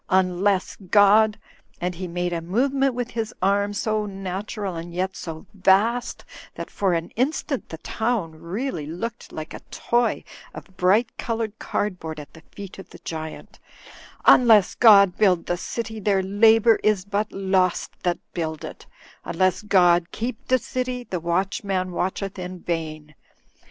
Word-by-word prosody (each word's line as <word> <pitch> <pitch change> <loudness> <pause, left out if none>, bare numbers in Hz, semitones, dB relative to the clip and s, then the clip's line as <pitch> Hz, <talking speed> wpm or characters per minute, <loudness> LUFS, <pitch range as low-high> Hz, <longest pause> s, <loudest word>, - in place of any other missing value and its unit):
'Un 185 -2 +2
less 200 -2 +1
God,' 205 +2 +4 0.2
" - - -35
and 180 +1 -2
he 180 +1 -6
made 175 0 -2
a 170 - -2
movement 265 +8 +1
with 245 0 -3
his 225 -2 -4
arm, 200 +2 +2
so 215 +1 -1
natural 195 0 -5
and 165 +1 -6
yet 185 +1 -1
so 160 -2 -7
vast 205 +5 +2 0.3
that - - -7
for 190 -3 +1
an 165 0 -3
instant 275 +2 -2
the 160 - -7
town 220 -1 -2
really 170 - -4
looked 210 +9 -6
like 155 0 -7
a - - -7
toy 240 0 0 0.3
of 190 - -11
bright 205 +6 +2
coloured 225 -2 -3
cardboard 170 -6 -3
at 145 -2 -11
the 160 - -14
feet 200 -1 -9
of 190 - -11
the - - -12
giant; 160 -1 -7 0.3
" - - -17
'imless 220 -6 +7
God 200 -5 +6
build 185 -5 +3
the 175 - 0
city, 220 +4 -5
their 195 -2 +1
labour 220 +3 +5
is 210 -3 +1
but 205 +1 -2
lost 190 -2 0
that 175 -2 0 0.2
build 160 -3 -3
it; - - -10 0.4
unless 185 +4 +1
God 175 -4 +4
keep 230 +1 -5
the 255 - +4
city, 250 +1 -3
the 185 -7 -4
watchman 185 +2 -1
watcheth 190 +2 -3
in 180 0 -6
vain. 155 -2 -4
195 Hz, 160 wpm, -23 LUFS, 175-220 Hz, 0.4 s, imless